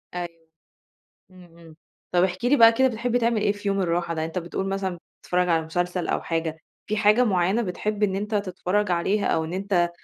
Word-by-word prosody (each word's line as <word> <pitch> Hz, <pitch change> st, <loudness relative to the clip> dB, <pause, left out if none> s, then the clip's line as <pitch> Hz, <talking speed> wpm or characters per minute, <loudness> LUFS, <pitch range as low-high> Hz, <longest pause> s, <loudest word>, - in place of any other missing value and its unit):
أيوه، 175 Hz, -1 st, -2 dB, 1.0 s
إمم، 185 Hz, -1 st, -15 dB
إمم، 165 Hz, -2 st, -15 dB, 0.4 s
طَب 175 Hz, -1 st, +3 dB
احكِ 185 Hz, +3 st, -3 dB
لي 260 Hz, +4 st, +4 dB
بقى 230 Hz, -3 st, +8 dB
كده 260 Hz, +3 st, +3 dB
بتحب 240 Hz, 0 st, -2 dB
تعمل 235 Hz, -2 st, +1 dB
إيه 205 Hz, -, +2 dB
في 205 Hz, 0 st, -5 dB
يوم 195 Hz, 0 st, 0 dB
الراحة 170 Hz, -1 st, -1 dB
ده، 160 Hz, -, -2 dB
أنت 165 Hz, +3 st, -4 dB
بتقُول 180 Hz, +2 st, -4 dB
مثلًا 195 Hz, -2 st, -3 dB, 0.2 s
بتتفرج 180 Hz, 0 st, 0 dB
على 165 Hz, -1 st, +2 dB
مسلسل 175 Hz, +2 st, -2 dB
أو -, -, 0 dB
حاجة، 165 Hz, -1 st, -2 dB, 0.3 s
في 215 Hz, -, -1 dB
حاجة 215 Hz, +3 st, +4 dB
معيّنة 190 Hz, +1 st, +1 dB
بتحب 210 Hz, +2 st, -3 dB
إن 195 Hz, -2 st, +2 dB
أنت 210 Hz, +2 st, -3 dB
تتفرج 200 Hz, 0 st, -1 dB
عليها 190 Hz, +4 st, +1 dB
أو 160 Hz, -, +1 dB
إن 160 Hz, -, -6 dB
أنت 185 Hz, -2 st, 0 dB
190 Hz, 205 wpm, -24 LUFS, 175-210 Hz, 1.0 s, بقى